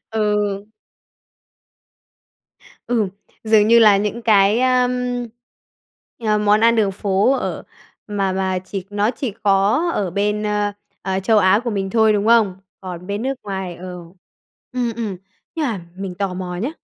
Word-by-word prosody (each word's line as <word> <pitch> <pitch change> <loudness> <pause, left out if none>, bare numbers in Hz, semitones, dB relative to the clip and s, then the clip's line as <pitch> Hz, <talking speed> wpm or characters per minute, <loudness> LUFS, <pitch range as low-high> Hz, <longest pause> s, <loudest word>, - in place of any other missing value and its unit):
Ừ. 220 -1 +1 2.6
Ừm, 230 -4 +1 0.4
dường 215 -1 +4
như 235 0 +7
là 210 -3 +7
những 210 +4 -2
cái, 210 +1 +4
ơ, 255 -1 +3 1.4
ờ, 215 -1 +2
món 210 +1 +3
ăn 230 +1 +4
đường 205 -3 +2
phố 200 +5 +1
ở 270 - -2 0.4
mà 200 -2 -1
mà 190 -1 -1
chỉ 185 0 -6
nó 205 +2 +1
chỉ 250 -2 -4
có 205 - +2
ở 190 -4 -1
bên, 210 +3 -1
ơ, 210 -1 0 0.3
ờ 190 0 -1
Châu 220 +3 +3
Á 195 +2 +4
của 240 - -1
mình 195 -2 -2
thôi, 220 -1 +4
đúng 205 0 0
không? 225 -5 +4 0.2
Còn 180 -1 -8
bên 205 +2 -3
nước 270 +1 -1
ngoài 190 -3 -5
ờ, 185 - -9 0.9
ừm, 245 -2 -1
ừm. 210 -5 -3 0.4
Nhưng 315 -3 -1
mà 215 -7 -3 0.2
mình 190 -2 -5
tò 190 -1 -3
mò 180 -1 -5
nhá, 235 +10 -2
205 Hz, 155 wpm, -20 LUFS, 195-225 Hz, 2.6 s, như